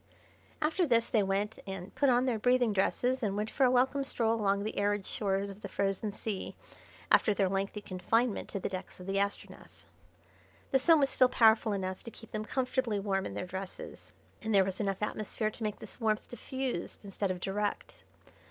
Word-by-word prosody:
After 325 Hz, +3 st, +2 dB
this 230 Hz, -3 st, +3 dB
they 220 Hz, -, +4 dB
went 200 Hz, +2 st, -1 dB
and 190 Hz, 0 st, -6 dB
put 280 Hz, -, +3 dB
on 250 Hz, 0 st, +4 dB
their 240 Hz, -4 st, 0 dB
breathing 245 Hz, -1 st, +3 dB
dresses 250 Hz, +6 st, +1 dB
and 205 Hz, -3 st, -1 dB
went 215 Hz, +1 st, -2 dB
for 270 Hz, -, +3 dB
a -, -, +5 dB
welcome 260 Hz, +3 st, +3 dB
stroll 230 Hz, -4 st, +1 dB
along 200 Hz, -3 st, +1 dB
the 215 Hz, -, -3 dB
arid 205 Hz, -1 st, +1 dB
shores 200 Hz, -1 st, -1 dB
of 195 Hz, +2 st, -12 dB
the -, -, -5 dB
frozen 200 Hz, +1 st, -1 dB
sea 205 Hz, -1 st, -4 dB, 0.6 s
after 210 Hz, -, +5 dB
their 195 Hz, -2 st, +2 dB
lengthy 195 Hz, +2 st, -2 dB
confinement 220 Hz, +5 st, 0 dB
to 200 Hz, -, -3 dB
the -, -, -2 dB
decks 185 Hz, -1 st, -6 dB
of 180 Hz, -, -9 dB
the 195 Hz, +1 st, 0 dB
Astronef. 200 Hz, 0 st, -4 dB, 0.9 s
The 265 Hz, -, +4 dB
Sun 320 Hz, +4 st, +5 dB
was 275 Hz, -, +3 dB
still 255 Hz, -1 st, +5 dB
powerful 225 Hz, -2 st, +5 dB
enough 190 Hz, -2 st, -3 dB
to -, -, -8 dB
keep 225 Hz, -1 st, -14 dB
them 215 Hz, 0 st, -3 dB
comfortably 255 Hz, -4 st, 0 dB
warm 195 Hz, -1 st, -1 dB
in -, -, -7 dB
their -, -, -3 dB
dresses, 190 Hz, +1 st, -8 dB, 0.3 s
and 220 Hz, -1 st, 0 dB
there 195 Hz, -1 st, +6 dB
was 190 Hz, -1 st, -4 dB
enough 195 Hz, 0 st, -1 dB
atmosphere 215 Hz, +1 st, -2 dB
to 230 Hz, -, -13 dB
make 210 Hz, -1 st, -2 dB
this -, -, -11 dB
warmth 215 Hz, -1 st, +1 dB
diffused 250 Hz, -6 st, -4 dB
instead 200 Hz, 0 st, -2 dB
of 185 Hz, -1 st, -2 dB
direct. 205 Hz, +3 st, -3 dB
210 Hz, 200 wpm, -31 LUFS, 195-240 Hz, 0.9 s, there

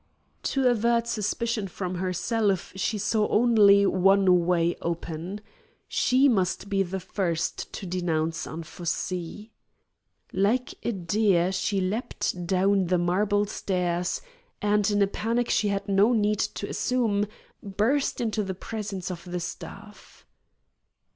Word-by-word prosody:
To 270 Hz, -2 st, +1 dB
avert 235 Hz, 0 st, +2 dB
suspicion 225 Hz, -1 st, -1 dB
from 185 Hz, 0 st, -5 dB
herself 190 Hz, +3 st, -1 dB
she 205 Hz, +3 st, -1 dB
saw 215 Hz, +1 st, +1 dB
only 210 Hz, -4 st, +5 dB
one 185 Hz, -2 st, +4 dB
way 170 Hz, -1 st, +2 dB
open. 170 Hz, +3 st, -4 dB, 0.5 s
She 260 Hz, +3 st, +3 dB
must 195 Hz, -4 st, 0 dB
be 195 Hz, -1 st, +1 dB
the 190 Hz, 0 st, -2 dB
first 175 Hz, -3 st, -2 dB
to 195 Hz, -, -6 dB
denounce 165 Hz, -3 st, -1 dB
Anfossi. 175 Hz, +5 st, -5 dB, 0.8 s
Like 220 Hz, +7 st, +1 dB
a -, -, -1 dB
deer 190 Hz, -1 st, +1 dB
she 195 Hz, +1 st, 0 dB
leaped 185 Hz, -3 st, -2 dB
down 190 Hz, 0 st, +2 dB
the 180 Hz, +1 st, +2 dB
marble 200 Hz, +4 st, +1 dB
stairs 180 Hz, -, -2 dB, 0.4 s
and, 210 Hz, 0 st, +2 dB
in 205 Hz, -1 st, +3 dB
a -, -, +2 dB
panic 230 Hz, +4 st, -1 dB
she 210 Hz, -, +2 dB
had 200 Hz, 0 st, -2 dB
no 200 Hz, +4 st, +4 dB
need 210 Hz, -2 st, +1 dB
to -, -, -2 dB
assume, 220 Hz, -5 st, 0 dB, 0.3 s
burst 220 Hz, +8 st, 0 dB
into 220 Hz, -2 st, 0 dB
the 190 Hz, -2 st, -4 dB
presence 200 Hz, -2 st, -5 dB
of 170 Hz, -1 st, -7 dB
the 180 Hz, 0 st, -4 dB
staff. 200 Hz, +4 st, -9 dB
200 Hz, 130 wpm, -26 LUFS, 180-215 Hz, 0.8 s, only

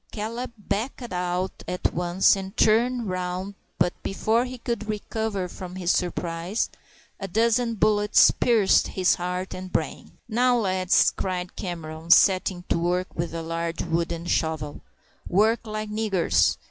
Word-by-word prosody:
Caleb 230 Hz, +3 st, -4 dB
backed 220 Hz, +3 st, -4 dB
out 180 Hz, +1 st, -2 dB
at 180 Hz, 0 st, -1 dB
once 175 Hz, +3 st, +3 dB
and 195 Hz, +1 st, -7 dB
turned 235 Hz, +2 st, +3 dB
round, 185 Hz, +1 st, -3 dB, 0.2 s
but 175 Hz, 0 st, +2 dB
before 225 Hz, +5 st, +1 dB
he 255 Hz, 0 st, -7 dB
could 235 Hz, -2 st, -4 dB
recover 210 Hz, -2 st, -2 dB
from 180 Hz, 0 st, -8 dB
his 180 Hz, -1 st, 0 dB
surprise 175 Hz, +3 st, -1 dB, 0.5 s
a 195 Hz, -, -4 dB
dozen 230 Hz, +4 st, +1 dB
bullets 210 Hz, 0 st, +5 dB
pierced 225 Hz, -5 st, +3 dB
his 185 Hz, -1 st, +4 dB
heart 180 Hz, +1 st, -3 dB
and 185 Hz, 0 st, -7 dB
brain. -, -, -3 dB
"Now, 245 Hz, +2 st, +3 dB
lads," 185 Hz, -4 st, +3 dB
cried 180 Hz, -1 st, -3 dB
Cameron, 165 Hz, -2 st, -6 dB
setting 185 Hz, 0 st, +4 dB
to -, -, +1 dB
work 180 Hz, +2 st, -1 dB
with 170 Hz, +1 st, -3 dB
a 165 Hz, -, -4 dB
large 165 Hz, 0 st, -3 dB
wooden 170 Hz, 0 st, -2 dB
shovel, 160 Hz, -4 st, -1 dB, 0.5 s
"work 220 Hz, +4 st, +2 dB
like 215 Hz, 0 st, -4 dB
niggers. 210 Hz, -5 st, +2 dB
190 Hz, 140 wpm, -25 LUFS, 175-220 Hz, 0.5 s, bullets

